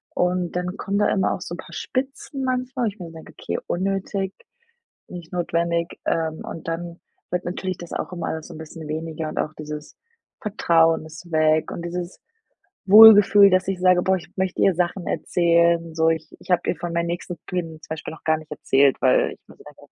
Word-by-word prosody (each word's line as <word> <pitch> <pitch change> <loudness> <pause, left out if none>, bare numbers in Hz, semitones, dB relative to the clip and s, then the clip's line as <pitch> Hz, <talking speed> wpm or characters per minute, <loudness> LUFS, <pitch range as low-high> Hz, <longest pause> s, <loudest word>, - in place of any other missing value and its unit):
Und 180 -1 0
dann 180 +2 -3
kommen 200 0 -2
da 205 - +3
immer 190 - +1
auch - - -6
so 175 - -6
'n - - -11
paar - - -11
Spitzen 270 +1 -4
manchmal, 255 0 -1
wo - - +1
ich 205 +2 -13
mir 170 -2 -8
denke: 160 -1 -12
„Okay, - - -3
unnötig, 195 +1 -2 0.8
nicht 175 -2 -10
notwendig“, 170 -1 -1
ähm, 160 -1 -1
und 165 - -8
dann 170 +1 -5 0.3
wird 180 0 -1
natürlich 185 0 -3
das 175 - -9
auch - - -4
immer 170 -2 -4
alles 160 -1 -4
so - - -10
'n - - -9
bisschen 160 0 -9
weniger 160 0 -4
und - - -5
auch 155 - -2
dieses 150 0 -8 0.5
Vertrauen 165 -7 +2
ist 160 +2 -12
weg 155 0 +2
und 170 - -6
dieses 175 +1 -5 0.7
Wohlgefühl, 205 -1 +9
dass 185 0 +2
ich 195 - -1
sage: 180 -1 +4
„Boah, 190 +1 +2
ich 180 - -10
möchte 190 -1 -1
ihr 195 - +4
Sachen 175 +1 -1
erzählen.“ 170 -1 +2
So, 160 0 +2
Ich 160 -1 -3
ich - - -13
habe 180 - +3
ihr - - +1
von 175 -1 -5
meinen 170 0 0
nächsten 175 +1 -4
Plänen 165 -3 -4
zum - - -14
Beispiel 160 0 -5
noch - - -17
gar 160 0 +2
nicht 155 0 -14
erzählt, 135 0 +3
weil 130 -1 +3
ich - - -15
mir - - -15
gedacht - - -15
habe: - - -17
175 Hz, 210 wpm, -23 LUFS, 160-190 Hz, 0.8 s, Wohlgefühl